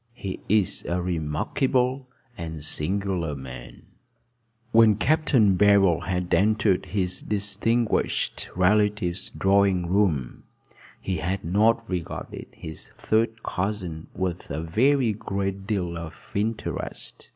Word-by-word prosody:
He 100 -6 -5
is 105 -3 +2
a 85 +1 -1
remarkable 125 - 0 0.3
and 80 -6 -6
singular 85 0 -1
man." 65 -3 -9 0.9
When 110 -2 +6
Capt. 155 +9 +1
Barold 100 - +4
had 90 -2 -1
entered 105 -2 +2
his 90 -1 -2
distinguished 105 +3 -1
relative's 100 -1 +2
drawing 95 -2 +2
room, 85 -9 0 0.5
he 95 -2 -2
had 90 +4 -2
not 110 +6 +2
regarded 90 -3 -5
his 80 -1 -8
third 115 +1 0
cousin 90 -5 -3
with 90 -2 -3
a 80 +3 -3
very 120 - +2
great 100 -1 -3
deal 90 -5 -1
of 85 -1 -9
interest. 110 +2 -4
95 Hz, 105 wpm, -25 LUFS, 85-105 Hz, 0.9 s, When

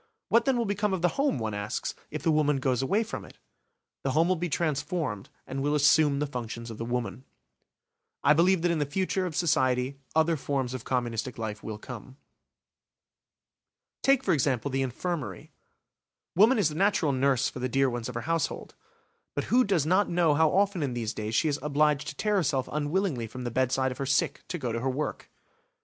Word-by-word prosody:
What 230 - +4
then 270 -2 +2
will 235 - +1
become 205 -1 0
of 175 - -6
the 175 - +5
home, 280 - +2
one 110 -3 -3
asks, 105 +1 -3 0.2
if - - -5
the 165 - +3
woman 150 -2 +2
goes 130 -2 0
away 200 +12 +1
from 220 - -6
it? - - -14 0.7
The 135 - 0
home 165 +2 +3
will 185 - +2
be 175 +1 -3
transformed 150 - -2 0.2
and 135 +1 -4
will 145 +2 +1
assume 150 0 +4
the 145 - 0
functions 115 -3 -6
of 110 - -9
the 115 - -3
woman. 125 +1 -3 1.0
I 150 - +6
believe 170 +2 +3
that 175 - +3
in 165 - 0
the 145 - 0
future 185 +3 -1
of 160 - -6
society 130 -5 +1 0.2
other 160 +1 +3
forms 135 -2 -2
of 130 -3 -6
communistic 120 -1 -2
life 110 -2 -4
will 110 -1 -5
come. 125 +3 -10 1.8
Take, 270 -1 +3
for - - +2
example, 140 -2 0
the 135 +1 0
infirmary; 130 - -4 0.8
woman 220 +8 +6
is 195 -7 +3
the - - -7
natural 180 -3 +2
nurse 135 -1 +2
for - - -6
the 130 +1 -2
dear 135 +2 +3
ones 120 -1 -3
of 125 - -7
her 120 - -2
household. 165 +5 -2 0.6
But - - -2
who 255 +1 +6
does 190 - +1
not 185 +5 +3
know 170 -3 +3
how 160 +1 +4
often 195 0 +2
in 135 -4 -1
these 115 -1 -2
days 110 +1 -3
she 160 - +3
is 145 -1 0
obliged 150 0 +1
to 150 - -5
tear 210 +4 +1
herself 140 -7 0
unwillingly 150 - -1
from 125 +3 -8
the 120 - -3
bedside 130 +2 +1
of 125 - -8
her 135 - -2
sick 135 - +1
to 180 - -3
go 125 -7 -3
to 115 - -2
her 130 +3 -1
work? 145 +4 -3
145 Hz, 205 wpm, -28 LUFS, 125-170 Hz, 1.8 s, I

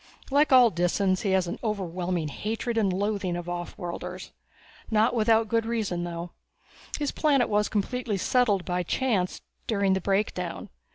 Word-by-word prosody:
Like 290 +2 +4
all 250 -3 +7
Disans, 185 +2 +1
he 200 - -1
has 190 -1 +3
an 170 - -5
overwhelming 180 -6 -2
hatred 225 - -3
and 210 -4 +2
loathing 195 -1 -1
of 175 - -5
offworlders. 175 0 -6 0.6
Not 220 +2 +3
without 225 -1 +3
good 230 +1 +1
reason, 205 -7 -1
though. 170 0 -6 0.7
His 290 -2 -1
planet 280 -6 +2
was 210 0 +1
settled - - -13
completely 220 -1 +1
by 180 0 -1
chance 190 0 -1 0.3
during 200 -3 +2
the 190 - 0
Breakdown. 195 -2 -1
200 Hz, 150 wpm, -27 LUFS, 180-225 Hz, 0.7 s, all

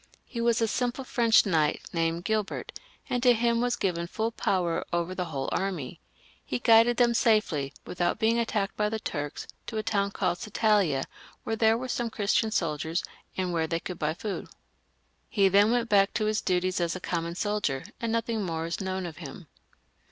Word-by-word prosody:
He 235 - -5
was 235 0 +2
a - - +2
simple 245 +3 -1
French 235 -3 +4
knight 160 -6 +1
named 165 0 0
Gilbert, 215 -2 -1 0.4
and 245 -1 -1
to 250 -1 +6
him 235 0 +1
was 245 0 +1
given 175 -6 -1
full 220 +5 -2
power 180 -6 0
over 175 +1 -1
the 180 -1 -2
whole 140 -5 -4
army. 185 -9 -2 0.4
He 125 - -2
guided 230 - +5
them 240 -1 +4
safely, 210 - +2
without 175 -1 -1
being 225 +1 +2
attacked 210 -4 -1
by 210 0 +1
the 220 - -2
Turks, 145 -8 -4 0.2
to 220 - -4
a 215 - -1
town 200 -2 +1
called 175 -2 -1
Satalia, 205 -9 +2 0.4
where 225 - -1
there 220 0 +4
were 255 +2 -4
some 240 -1 -1
Christian 220 -1 +1
soldiers, 160 -4 -1 0.3
and 185 -2 -1
where 160 -1 +1
they 165 +1 -1
could 180 0 -7
buy 155 0 0
food. 200 +2 -4 0.8
He 200 -5 +3
then 200 +3 +5
went 240 0 +1
back 200 -2 +3
to 215 - +1
his 215 0 +1
duties 185 0 0
as 170 0 0
a - - -4
common 170 -1 -3
soldier, 205 -10 -1 0.2
and 230 -1 -1
nothing 230 -1 -1
more 165 -3 -2
is 170 +3 -3
known 190 -1 -2
of 165 -3 -7
him. 165 +1 -9
200 Hz, 190 wpm, -28 LUFS, 170-225 Hz, 0.8 s, to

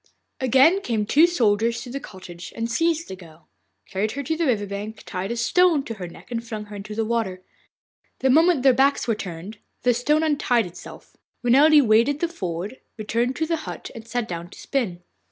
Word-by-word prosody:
Again 265 - +4
came 230 - -1
the - - -1
two 305 +10 +5
soldiers 230 -7 +1
to 245 - -9
the 275 - -4
cottage 180 -7 -10
and 230 +1 -3
seized 330 +2 +1
the 190 - -6
girl, 165 -3 -16 0.4
carried 205 +3 -2
her 280 - -4
to 320 +4 -1
the 330 -1 0
river 215 -5 +1
bank, 205 +2 -6
tied 185 +1 -4
a 235 - -3
stone 320 +5 +3
to 230 - -5
her 190 -5 -7
neck 175 - -14
and 230 -1 -3
flung 220 -2 -6
her 205 0 -10
into 205 +1 -7
the 225 0 0
water. 215 -5 -2 0.7
The 265 - +2
moment 320 -1 +4
their 265 -2 +6
backs 275 +1 +2
were 230 - +2
turned 195 +1 -7 0.2
the 245 - +4
stone 295 +6 +1
untied 270 -7 +2
itself. 175 0 -12 0.3
Renelde 285 +4 +6
waded 230 +7 +3
the 340 - +1
ford, 195 - -5 0.2
returned 230 +4 -1
to 320 - -1
the 330 +1 -1
hut, 310 - -7
and 230 -2 -10
sat 240 -1 -2
down 170 0 -6
to - - -14
spin. 195 -11 -2
230 Hz, 210 wpm, -23 LUFS, 205-280 Hz, 0.7 s, their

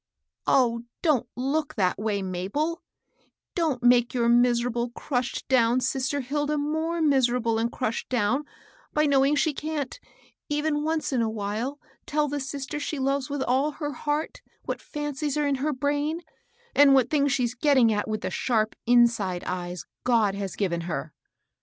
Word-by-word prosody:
Oh, 235 -3 +3 0.2
don't 275 -8 +2
look 280 +4 -1
that 185 -3 +1
way, 210 -2 -1
Mabel 190 - -1
1 335 - -5 0.8
don't 305 -8 0
make 245 0 +4
your 235 -1 +2
miserable, 240 0 +2
crushed 245 +1 -3
down 245 -1 +4
sister 265 +2 -1
Hilda 290 +3 -1
more 315 +3 -1
miserable 245 -5 +2
and 230 +1 0
crushed 230 -3 -3
down 250 +4 +1 0.5
by 300 0 +3
knowing 280 0 +4
she 300 +1 +2
can't, 300 - -4 0.5
even 295 0 0
once 315 -2 -1
in 250 - +2
a 225 - +1
while, 220 +6 -3 0.3
tell 300 0 +1
the 290 0 -2
sister 280 +2 -4
she 295 +1 -3
loves 275 +1 0
with 280 -1 -2
all 270 +4 +1
her 295 -1 -4
heart 295 +3 -3 0.2
what - - -4
fancies 295 -1 -3
are 300 - +1
in 280 -1 +1
her 305 +2 +1
brain, 290 +4 -1 0.5
and 280 -1 +7
what 255 -3 +3
things 285 -2 +2
she's 250 -3 +1
getting 255 -4 +4
at 205 - -1
with 215 -1 -2
the 185 - -3
sharp 220 +1 0
irmde 230 -7 +3
eyes 175 -1 -4 0.2
God 225 -5 +3
has 195 -2 -4
given 175 -4 -1
her. 150 0 -4
260 Hz, 165 wpm, -26 LUFS, 230-295 Hz, 0.8 s, and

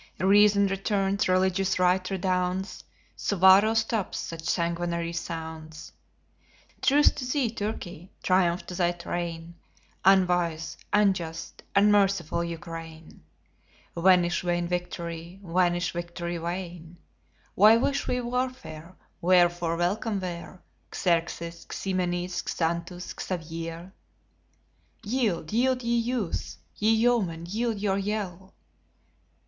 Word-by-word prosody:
Reason 200 +1 +5
returns, 195 0 0
religious 190 +1 +2
right 185 0 +3
redounds, 185 0 -1 0.3
Suwarrow 195 +3 +5
stops 220 -3 0
such 165 -1 -6
sanguinary 170 -1 -1
sounds. 160 -2 -7 0.9
Truce 290 +2 +5
to - - -6
thee, 250 -2 0
Turkey! 195 -5 -5
Triumph 180 -1 +2
to - - -8
thy 175 -1 +1
train, 170 -1 -5 0.5
Unwise, 180 -4 +2 0.2
unjust, 185 -6 0
unmerciful 195 -5 +3
Ukraine! 165 -1 -8 0.7
Vanish 175 0 +4
vain 175 -1 -1
victory! 170 0 -5
vanish, 175 0 +1
victory 170 0 -4
vain! 170 -1 -6 0.6
Why 215 +4 +7
wish 275 +3 0
we 250 - 0
warfare? 240 -10 -4 0.3
Wherefore 175 -1 +3
welcome 200 +4 0
were 175 -1 -7 0.3
Xerxes, 170 -1 -1
Ximenes, 180 -1 -2
Xanthus, 170 +2 -2
Xavier? 165 +1 -5 1.1
Yield, 210 -8 -1
yield, 255 +2 +2
ye 235 0 +1
youths! 235 -5 -2 0.2
ye 215 - +1
yeomen, 220 -8 +1
yield 225 +3 -1
your 200 -1 0
yell! 195 -2 -4
180 Hz, 100 wpm, -27 LUFS, 170-200 Hz, 1.1 s, Why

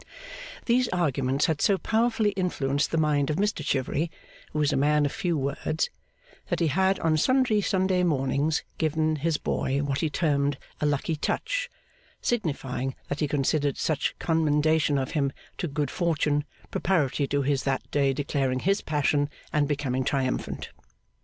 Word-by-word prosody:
These 250 +1 +3
arguments 140 -5 +1
had 160 -4 0
so 200 - +4
powerfully 225 0 +1
influenced 150 -7 0
the 165 - -1
mind 150 -3 +2
of 155 - +1
Mr 205 -3 0
Chivery, 140 +4 0 0.4
who - - -4
was 150 -1 +2
a - - +1
man 145 +2 +3
of 145 - 0
few 170 -3 -1
words, 140 +3 -1 0.6
that - - -1
he 165 -2 +2
had 190 +5 +2
on 160 -1 +2
sundry 255 - +3
Sunday 190 -2 +1
mornings, 150 -1 +1 0.2
given 155 0 +1
his 155 +1 0
boy 140 +2 -1
what 140 -1 -1
he 160 - 0
termed 145 -3 +1 0.2
'a 150 - +1
lucky 145 +3 0
touch,' - - -1 0.5
signifying 135 - -2
that 145 - -2
he 150 - +1
considered 145 0 +1
such 150 -3 0
commendation 155 -2 +2
of 130 -1 -2
him 140 -3 +1 0.3
to 175 - -1
Good 145 0 -2
Fortune, 150 -4 +1 0.3
preparatory 145 -6 +1
to 140 0 0
his 140 -1 +1
that 135 -1 0
day 140 -2 +3
declaring 135 -2 -1
his 195 +3 +2
passion 145 -1 +1 0.2
and 150 -1 +2
becoming 135 -3 -1
triumphant. 130 -1 -2
150 Hz, 160 wpm, -27 LUFS, 140-170 Hz, 0.6 s, so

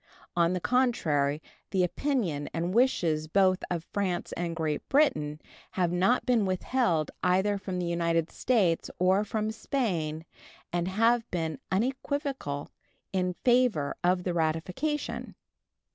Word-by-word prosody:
On 170 0 +3
the 180 - -1
contrary, 160 - +1 0.3
the 190 -2 +2
opinion 180 - -1
and 170 +2 -1
wishes 170 -11 +2
both 185 +2 +3
of 170 -2 -2
France 185 -2 -2
and 170 -1 -3
Great 155 -2 -2
Britain 155 - +2 0.3
have 180 -2 +1
not 190 +8 +2
been 240 -4 +3
withheld 185 - 0
either 190 +3 +2
from 185 -1 -4
the 180 - -1
United 170 -1 0
States 200 -10 +1
or 185 +3 +3
from 215 +1 -2
Spain, 175 - -2 0.5
and 175 0 0
have 230 +4 +2
been 160 -4 -2
unequivocal 260 - -2 0.4
in 180 -1 0
favor 245 - +3
of 180 0 +2
the 180 - -1
ratification. 175 - -2
180 Hz, 130 wpm, -28 LUFS, 165-230 Hz, 0.5 s, On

